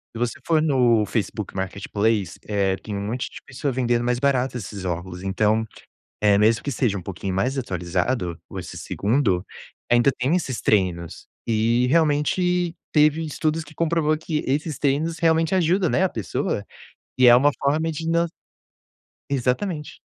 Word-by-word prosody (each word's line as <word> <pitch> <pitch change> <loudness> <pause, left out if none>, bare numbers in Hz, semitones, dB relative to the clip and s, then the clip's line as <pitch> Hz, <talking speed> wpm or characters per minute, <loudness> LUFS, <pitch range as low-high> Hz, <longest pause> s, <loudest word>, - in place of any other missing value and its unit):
Se - - -5
você 120 -1 -2
for 160 -2 +3
no 125 -7 +3
Facebook 105 -1 -3
Marketplace, 100 +1 -1
eh, 100 -2 +1
tem 105 +1 -7
um 100 - -3
monte 120 +4 -3
de - - -10
pessoas 135 0 -3
vendendo 120 -2 +1
mais 120 0 +1
barato 130 -2 +1
esses 100 -3 -7
óculos, 90 0 -4
então, 105 +3 +1 0.6
eh, 105 -1 +5
mesmo 110 +2 +3
que 140 - -2
seja 115 -5 0
um - - -6
pouquinho 95 +1 -5
mais 130 +8 0
atualizado, 90 -2 -2 0.2
esse - - -7
segundo, 100 -5 0 0.5
ainda 120 +2 +5
tem 130 +7 +1
esses 135 -9 -2
treinos. 90 -5 0 0.2
E 115 +2 +2
realmente, 170 +4 +2 0.2
teve 155 +1 +4
estudos 155 +1 -1
que 150 +1 -15
comprovou 160 -1 +1
que 155 -1 -2
esses 145 +2 -1
treinos 150 +4 0
realmente 165 0 +2
ajudam, 180 +1 +2
né, 185 - +2
a 190 - +2
pessoa. 110 - -3 0.5
E 130 - +6
é 120 - +9
uma 135 +4 +5
forma 155 +4 +1
de 160 +1 -4
na 170 +1 +2 1.0
exatamente. 140 - -1
125 Hz, 160 wpm, -23 LUFS, 105-155 Hz, 1.0 s, é